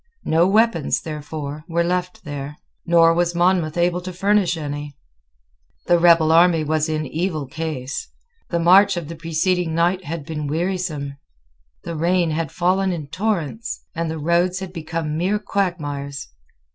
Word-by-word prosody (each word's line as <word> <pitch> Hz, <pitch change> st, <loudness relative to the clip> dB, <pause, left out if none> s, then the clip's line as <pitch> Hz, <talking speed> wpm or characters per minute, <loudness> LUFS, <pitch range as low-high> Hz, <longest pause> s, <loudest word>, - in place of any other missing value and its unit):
No 165 Hz, +3 st, +3 dB
weapons, 215 Hz, -6 st, +2 dB
therefore, 150 Hz, -1 st, -6 dB
were 170 Hz, 0 st, +1 dB
left 180 Hz, +1 st, -2 dB
there; 145 Hz, 0 st, -6 dB, 0.3 s
nor 165 Hz, -1 st, +5 dB
was 175 Hz, 0 st, 0 dB
Monmouth 175 Hz, -2 st, +2 dB
able 175 Hz, +1 st, +1 dB
to 185 Hz, +1 st, -6 dB
furnish 190 Hz, -1 st, +1 dB
any. 145 Hz, -2 st, -5 dB, 0.9 s
The 175 Hz, -, +4 dB
rebel 165 Hz, -2 st, +5 dB
army 165 Hz, -1 st, +5 dB
was 155 Hz, +1 st, 0 dB
in 155 Hz, -1 st, -1 dB
evil 155 Hz, +1 st, -2 dB
case. 150 Hz, -, -5 dB, 0.4 s
The 170 Hz, -, 0 dB
march 180 Hz, +3 st, +5 dB
of 165 Hz, -3 st, -5 dB
the 165 Hz, -, -6 dB
preceding 165 Hz, +1 st, 0 dB
night 175 Hz, +2 st, +1 dB
had 160 Hz, -1 st, -5 dB
been 150 Hz, -2 st, -4 dB
wearisome. 160 Hz, -3 st, -2 dB, 0.7 s
The 170 Hz, -, -5 dB
rain 170 Hz, +1 st, +1 dB
had 160 Hz, -2 st, -2 dB
fallen 185 Hz, +2 st, +1 dB
in 155 Hz, -5 st, -5 dB
torrents; 215 Hz, +3 st, -2 dB
and 165 Hz, -1 st, -2 dB
the 160 Hz, -, -3 dB
roads 170 Hz, +4 st, +1 dB
had 190 Hz, -1 st, -6 dB
become 160 Hz, -2 st, -3 dB
mere 190 Hz, +4 st, +1 dB
quagmires. 145 Hz, -9 st, -3 dB
165 Hz, 150 wpm, -21 LUFS, 155-180 Hz, 0.9 s, nor